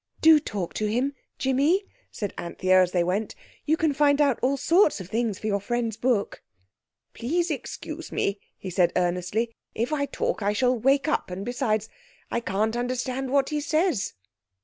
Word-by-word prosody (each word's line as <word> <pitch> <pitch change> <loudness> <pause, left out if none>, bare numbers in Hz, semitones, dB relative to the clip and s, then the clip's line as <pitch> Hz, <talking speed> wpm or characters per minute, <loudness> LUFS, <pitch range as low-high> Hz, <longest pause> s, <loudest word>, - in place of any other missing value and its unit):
"Do 320 -1 +7
talk 205 - -4
to 215 - -1
him—Jimmy," 275 - 0 0.3
said 205 -3 -5
Anthea 185 +2 +2
as 180 -1 +2
they 175 -2 +2
went; 195 +5 -1 0.3
"you 315 +1 +2
can 315 -2 +2
find 285 0 +3
out 280 -5 +3
all 270 +3 +2
sorts 335 - +3
of 185 -1 -8
things 225 -2 -1
for - - -9
your 200 -2 +1
friend's 230 +1 -2
book." 230 -2 0 0.7
"Please 335 +8 -1
excuse 275 -5 -6
me," 200 0 -1 0.2
he 190 - -7
said 180 -1 +3
earnestly. 180 +6 0 0.2
"If 235 +7 -1
I 285 -2 0
talk 270 - -2
I 205 +1 +1
shall 250 +4 +2
wake 270 +5 +2
up; 305 - 0
and 185 +2 -5
besides, 225 -3 0 0.4
I - - +1
can't 215 +1 -1
understand 255 +2 -2
what 275 0 +2
he 300 -1 -1
says." 310 - 0
240 Hz, 170 wpm, -26 LUFS, 200-280 Hz, 0.7 s, Do